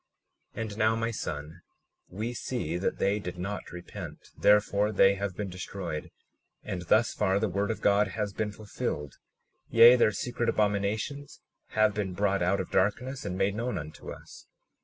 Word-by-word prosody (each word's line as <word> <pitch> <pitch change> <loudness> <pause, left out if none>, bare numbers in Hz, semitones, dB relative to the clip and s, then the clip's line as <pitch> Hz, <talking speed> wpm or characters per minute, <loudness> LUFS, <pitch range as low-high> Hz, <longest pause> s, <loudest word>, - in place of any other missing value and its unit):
37:26 - - -4
And 110 -2 -5
now, 110 +1 +4
my 115 +1 -1
son, 80 -5 -5 0.5
we 110 +6 -4
see 120 -9 -3
that 95 - -1
they 100 +2 +1
did 90 -3 -6
not 95 +2 -5
repent; 90 0 -9
therefore 105 0 +3
they 100 -1 +5
have 100 -1 -3
been 105 - -2
destroyed, 90 -3 -5 0.5
and 90 -2 -4
thus 110 +5 +4
far 100 -1 +1
the 110 - +1
word 100 +2 -1
of 110 - -3
God 105 +1 +4
has 100 +1 -3
been 105 0 -2
fulfilled; 100 - -4 0.6
yea, 115 +2 +9
their 120 -3 +4
secret 120 +3 -2
abominations 105 +7 -1 0.4
have 110 -1 +5
been 100 -3 -2
brought 100 0 +1
out 90 +3 +2
of 95 - -4
darkness 120 +7 0
and 95 -2 -3
made 95 +1 +2
known 115 0 -2
unto 75 -1 -8
us. - - -12
100 Hz, 170 wpm, -29 LUFS, 95-110 Hz, 0.6 s, yea